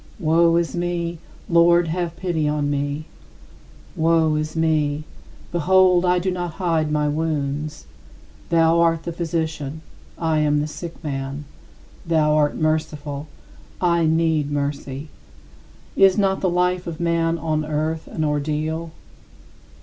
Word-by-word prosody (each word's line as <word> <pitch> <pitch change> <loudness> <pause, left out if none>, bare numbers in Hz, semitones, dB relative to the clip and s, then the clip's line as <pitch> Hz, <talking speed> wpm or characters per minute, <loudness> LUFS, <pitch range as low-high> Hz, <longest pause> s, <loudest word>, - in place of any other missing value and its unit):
Woe 165 0 +3
is 170 0 0
me! 175 -1 -2 0.3
Lord, 170 0 +4
have 170 0 -2
pity 170 -5 -1
on 150 -1 0
me. 145 +2 -2 0.9
Woe 160 -1 +3
is 155 +1 -2
me! 155 -2 +1 0.5
Behold, 180 +1 +4
I 180 0 +3
do 185 +1 0
not 175 -2 -3
hide 165 -4 0
my 150 -1 +1
wounds. 150 -1 -2 0.6
Thou 165 0 +4
art 165 -1 +2
the 170 - -4
Physician, 160 -3 -3 0.4
I 160 -2 +1
am 150 -1 +2
the 150 - 0
sick 165 +2 -8
man; 140 0 -4 0.6
thou 155 -2 +2
art 150 -1 +2
merciful, 155 -2 -2 0.5
I 170 -2 +2
need 160 -2 +1
mercy. 140 0 -3 0.9
Is 195 0 +5
not 195 -2 +1
the 185 - +2
life 180 +1 0
of 165 -2 -5
man 170 -1 +1
on 155 -1 -1
earth 155 +1 -2
an 155 - -3
ordeal? 155 +2 -2
160 Hz, 130 wpm, -22 LUFS, 150-170 Hz, 0.9 s, Is